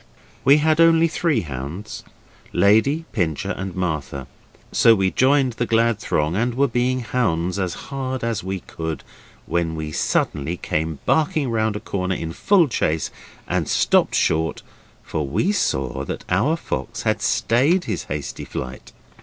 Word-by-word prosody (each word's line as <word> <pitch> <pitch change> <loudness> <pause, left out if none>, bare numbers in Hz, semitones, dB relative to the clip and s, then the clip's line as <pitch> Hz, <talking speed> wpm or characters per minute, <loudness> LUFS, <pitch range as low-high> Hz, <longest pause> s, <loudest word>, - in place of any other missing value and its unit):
We 140 +3 +7
had 155 +1 +3
only 165 0 +6
three 165 -1 0
hounds 75 +7 -6 0.5
Lady, 125 +11 +3
Pincher 80 -7 -1
and 95 -1 -5
Martha 75 -7 -3 0.5
so 115 -1 +6
we 95 -2 +1
joined 130 -1 +3
the 120 0 -2
glad 115 -1 +2
throng 75 +3 0
and 120 +3 0
were 140 +2 +3
being 125 +1 0
hounds 95 -7 0
as 90 -3 -1
hard 130 -2 -4
as 115 -3 -1
we 95 0 -4
could, 80 -1 -5 0.4
when 85 -2 -1
we 80 -1 -4
suddenly 75 +2 -1
came 80 -1 -2
barking 150 -4 +1
round 110 -2 0
a - - -2
corner 95 -2 -2
in 80 -1 -4
full 185 - +3
chase 80 - -1 0.4
and - - -1
stopped - - +3
short, 80 +1 +1 0.4
for 75 -3 -3
we 105 - +1
saw 70 - -1
that - - -6
our 125 - +2
fox - - -4
had - - 0
stayed 145 +11 +2
his - - -3
hasty 75 0 -5
flight. 65 0 -7
105 Hz, 155 wpm, -22 LUFS, 80-130 Hz, 0.5 s, We